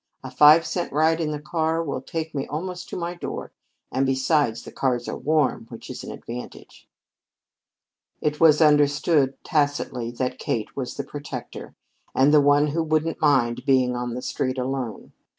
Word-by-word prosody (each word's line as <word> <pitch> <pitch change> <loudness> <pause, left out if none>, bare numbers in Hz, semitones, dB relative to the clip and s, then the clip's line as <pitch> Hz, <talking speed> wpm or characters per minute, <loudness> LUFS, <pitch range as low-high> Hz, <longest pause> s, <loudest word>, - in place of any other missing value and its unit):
A 130 - -7
five 150 +5 +7
cent 175 - -3
ride 160 +3 +2
in 155 - -1
the 150 -1 -3
car 160 +2 -1
will 140 -4 -4
take 160 +3 -5
me 140 -2 -3
almost 180 +4 -5
to - - -5
my 170 0 -3
door; 175 - -6 0.4
and 135 - +1
besides 135 -2 +1
the - - -10
cars 125 -3 -1
are - - -3
warm, 155 -2 0
which - - -9
is - - -7
an - - -7
advantage." 120 +1 -9 1.3
It 150 0 -1
was 160 -1 +6
understood 145 -1 +3
tacitly 145 -6 -1
that 125 +1 -3
Kate 110 -2 -3
was 130 -3 -4
the - - -3
protector, 145 -4 -8 0.4
and 140 +3 +4
the 150 - +7
one 145 +1 +4
who 150 +3 -1
wouldn't 160 0 -1
mind 125 -5 +2
being 130 -3 +2
on 120 -1 -3
the 125 - -5
street 130 -2 -2
alone. 125 -4 -4
145 Hz, 170 wpm, -24 LUFS, 130-155 Hz, 1.3 s, five